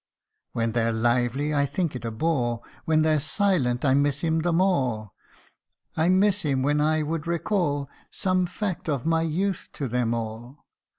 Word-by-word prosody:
227 - - -37
When 115 0 +1
they're 115 -1 0 0.3
lively, 145 +4 -2
I 140 -1 +2
think 150 +1 -2
it 125 - -6
a 115 - -2
bore; 120 -2 -1 0.2
When 155 -1 +3
they're 155 -1 +3
silent, 145 -6 +1
I 130 - +4
miss 140 0 +2
him 160 -1 +1
the 175 +2 0
more. 130 - +1 0.8
I 160 +2 +2
miss 195 +2 +3
him 135 -5 0
when 145 +2 +2
I 155 +1 +2
would 160 +1 -3
recall 170 -5 0 0.2
Some 185 -1 0
fact 185 -2 -4
of 140 -3 -1
my 165 0 +2
youth 175 +4 -1
to 140 - -3
them 120 -1 0
all. 115 +4 -7
150 Hz, 175 wpm, -25 LUFS, 125-170 Hz, 0.8 s, I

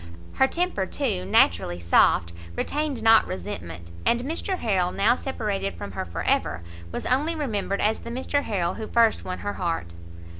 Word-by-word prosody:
Her 265 - +4
temper, 335 - -1
too, 140 - -1
naturally 85 -2 +3
soft, 85 0 +3 0.2
retained 290 - -2
not 225 0 +6
resentment, 85 -3 -6
and 240 - +2
Mr 330 +7 -2
Harrel, 185 - +1
now 210 +6 +3
separated 210 - -3
from 90 +3 -7
her 95 - -4
for 85 - -5
ever, 85 - 0 0.3
was - - -4
only 295 +6 +1
remembered 210 -9 -2
as 215 +1 +1
the - - -8
Mr 260 +4 -1
Harrel 185 -8 -1
who 220 -1 -6
first 230 -1 +3
won 185 - -4
her 205 - -1
heart. 165 - -3
205 Hz, 165 wpm, -25 LUFS, -, 0.3 s, not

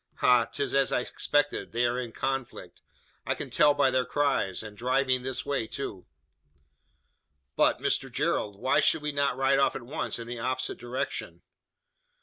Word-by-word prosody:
Ha! 125 -2 +4
'tis 140 - -3
as 135 -1 +3
I - - +2
expected: 145 +1 -1
they 120 +1 +2
are 120 +1 0
in 120 -2 -5
conflict. 135 +1 -4 0.4
I - - -1
can - - -6
tell 145 -1 +5
by 140 -2 +3
their 130 0 +2
cries! 135 -10 0
And 105 -1 -9
driving 130 +2 +1
this 130 -1 -3
way, 140 -6 -1
too!" 110 -8 -6 1.5
"But, - - +3
Mr - - -1
Gerald; 100 -1 -1
why 130 +5 +3
should 155 - +2
we 150 - -1
not 140 -3 0
ride 135 +1 +3
off 135 - +2
at 125 - -5
once, 130 +6 -3
in 115 - -6
the 120 0 -6
opposite 130 +3 -2
direction?" 120 +2 -4
130 Hz, 170 wpm, -28 LUFS, 120-140 Hz, 1.5 s, tell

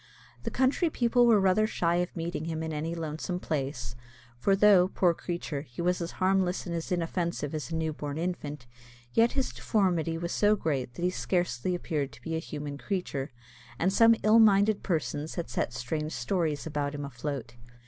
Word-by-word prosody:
The - - -3
country 265 +6 +2
people 245 -3 +3
were 225 -3 +6
rather 195 +3 +3
shy 170 -5 +1
of 180 0 -2
meeting 165 -1 -3
him 160 -1 -3
in 160 -1 -3
any 160 +3 -3
lonesome 165 +2 -3
place, 135 -8 -3 0.4
for 195 +11 +2
though, 195 -3 +6
poor 180 -2 +2
creature, 170 -4 -4
he 125 -5 -14
was 180 +1 +1
as 170 - -4
harmless 185 -1 +1
and 175 - -4
as 165 +1 -4
inoffensive 170 -3 -1
as 155 0 -4
a 165 - -3
newborn 155 -2 -3
infant, 150 -6 -4 0.5
yet 230 +1 +4
his 270 -2 -1
deformity 175 -6 +1
was 170 +1 -3
so 210 0 +4
great 135 -9 -2
that 175 - -5
he 180 - +2
scarcely 180 -3 -1
appeared 150 -5 -2
to - - -15
be 165 -1 -3
a - - 0
human 145 -3 -6
creature, 180 -9 -3 0.5
and 185 +6 +1
some 230 +2 +6
ill 215 +2 +6
minded 205 -1 +5
persons 155 -3 -2
had 170 - -4
set - - -1
strange 150 +6 -3
stories 150 +3 -1
about 145 -2 -2
him 145 0 -4
afloat. 135 -2 -5
170 Hz, 185 wpm, -29 LUFS, 150-190 Hz, 0.5 s, were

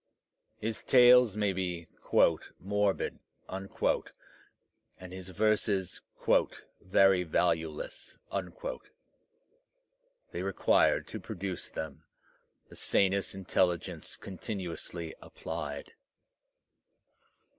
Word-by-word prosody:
His 110 0 -3
tales 125 -4 +7
may 105 -2 +1
be 90 -3 -3 0.7
"morbid," 100 +1 0 0.3
and 95 -1 -5
his 95 0 -7
verses 100 -1 +1 0.8
"very 95 0 +4
valueless." 80 -2 -1 2.1
They - - -4
required, - - +3
to - - -5
produce 100 -4 -4
them, 80 -4 -6 0.6
the - - -14
sanest 100 0 +2
intelligence 90 -2 0
continuously 90 -4 -5
applied. - - -6
95 Hz, 70 wpm, -31 LUFS, 90-100 Hz, 2.1 s, tales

